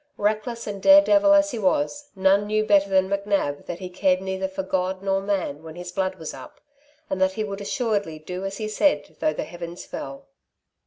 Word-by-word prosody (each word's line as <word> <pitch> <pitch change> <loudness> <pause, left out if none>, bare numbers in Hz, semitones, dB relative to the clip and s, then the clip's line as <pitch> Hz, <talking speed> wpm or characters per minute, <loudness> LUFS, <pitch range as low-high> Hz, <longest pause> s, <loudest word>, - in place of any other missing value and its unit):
Reckless 215 +3 -1
and 200 -2 -5
dare 295 +4 +8
devil 300 0 +4
as 300 0 +5
he 235 - -4
was, 290 +7 0
none 195 +2 +3
knew 215 0 +1
better 200 -2 +4
than 190 -1 +3
McNab 200 -7 -1
that 175 - -4
he 185 - -6
cared 185 0 +1
neither 190 0 -3
for 190 0 -5
God 190 0 -2
nor 195 0 +1
man 190 -7 -2
when 160 0 -10
his 175 0 -7
blood 190 0 -1
was 160 -4 -7
up, 130 - -12 0.5
and 190 - -3
that 190 0 +3
he 215 +2 -2
would 200 -1 -5
assuredly 205 - -1
do 180 +4 -6
as 195 0 -4
he 215 - -3
said 210 - +1
though 155 - +2
the - - -3
heavens 175 +1 -8
fell. 135 0 -7
195 Hz, 210 wpm, -24 LUFS, 180-215 Hz, 0.5 s, dare